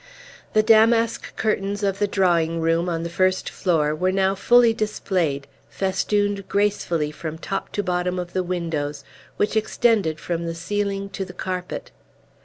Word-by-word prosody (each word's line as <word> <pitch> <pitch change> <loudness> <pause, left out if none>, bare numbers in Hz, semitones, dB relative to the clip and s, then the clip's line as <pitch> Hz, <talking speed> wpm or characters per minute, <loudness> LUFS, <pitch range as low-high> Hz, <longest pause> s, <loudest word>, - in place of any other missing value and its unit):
The 215 - +4
damask 225 +1 +3
curtains 205 -2 -1
of 195 -1 0
the 205 - +2
drawing 170 -4 +2
room, 165 +2 +1
on 165 -1 -2
the - - -2
first 185 +1 +1
floor, 155 -5 +1
were 185 +4 0
now 190 0 +2
fully 240 +3 +5
displayed, 185 -10 -1 0.2
festooned 200 +1 -1
gracefully 195 -7 0
from 160 +1 -6
top 195 +4 -4
to 205 - -1
bottom 180 0 -1
of 175 -1 -5
the 185 - +1
windows, 165 -5 -3 0.3
which 210 - 0
extended 215 -7 +2
from 170 -1 -3
the 165 - -3
ceiling 200 +2 -2
to 195 - -3
the 185 - -9
carpet. 180 -1 -5
185 Hz, 155 wpm, -23 LUFS, 170-205 Hz, 0.3 s, fully